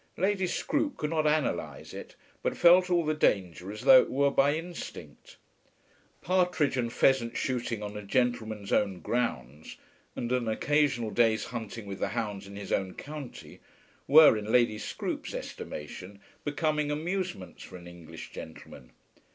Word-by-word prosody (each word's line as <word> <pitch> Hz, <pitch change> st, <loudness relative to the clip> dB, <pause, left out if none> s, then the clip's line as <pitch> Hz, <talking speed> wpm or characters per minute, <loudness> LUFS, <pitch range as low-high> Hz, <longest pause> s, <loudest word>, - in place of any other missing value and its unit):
Lady 190 Hz, 0 st, +1 dB
Scroope 290 Hz, -, -1 dB
could 150 Hz, 0 st, -3 dB
not 155 Hz, -2 st, +1 dB
analyse 150 Hz, -1 st, -1 dB
it, -, -, -9 dB, 0.3 s
but -, -, -2 dB
felt 180 Hz, +1 st, +6 dB
all 175 Hz, -2 st, +2 dB
the 155 Hz, -, +1 dB
danger 95 Hz, -, 0 dB
as 105 Hz, +1 st, -8 dB
though 130 Hz, 0 st, +8 dB
it -, -, -5 dB
were 140 Hz, +1 st, +2 dB
by 140 Hz, +2 st, +3 dB
instinct. 170 Hz, +2 st, -8 dB, 0.9 s
Partridge 180 Hz, -6 st, +1 dB
and 120 Hz, -2 st, -1 dB
pheasant 120 Hz, -2 st, +2 dB
shooting 120 Hz, -4 st, -2 dB
on 105 Hz, 0 st, -6 dB
a 105 Hz, -, -5 dB
gentleman's 110 Hz, -2 st, -1 dB
own 100 Hz, -3 st, +1 dB
grounds, 75 Hz, -, -3 dB, 0.4 s
and 120 Hz, -, -4 dB
an 125 Hz, -2 st, 0 dB
occasional 135 Hz, -1 st, +1 dB
day's 110 Hz, -2 st, +2 dB
hunting 115 Hz, -2 st, -6 dB
with 100 Hz, -1 st, -7 dB
the -, -, 0 dB
hounds 105 Hz, -4 st, -4 dB
in 100 Hz, -, -10 dB
his 100 Hz, -1 st, -7 dB
own 95 Hz, -2 st, -1 dB
county, 145 Hz, -3 st, -9 dB, 0.5 s
were, 150 Hz, -3 st, +8 dB
in 105 Hz, 0 st, -4 dB
Lady 115 Hz, -3 st, +3 dB
Scroope's -, -, -4 dB
estimation, 90 Hz, +6 st, -7 dB, 0.2 s
becoming 150 Hz, 0 st, 0 dB
amusements 165 Hz, -, -3 dB
for 95 Hz, -, -10 dB
an 90 Hz, -, -13 dB
English 85 Hz, -2 st, -11 dB
gentleman. 80 Hz, -5 st, -11 dB
120 Hz, 150 wpm, -29 LUFS, 100-150 Hz, 0.9 s, though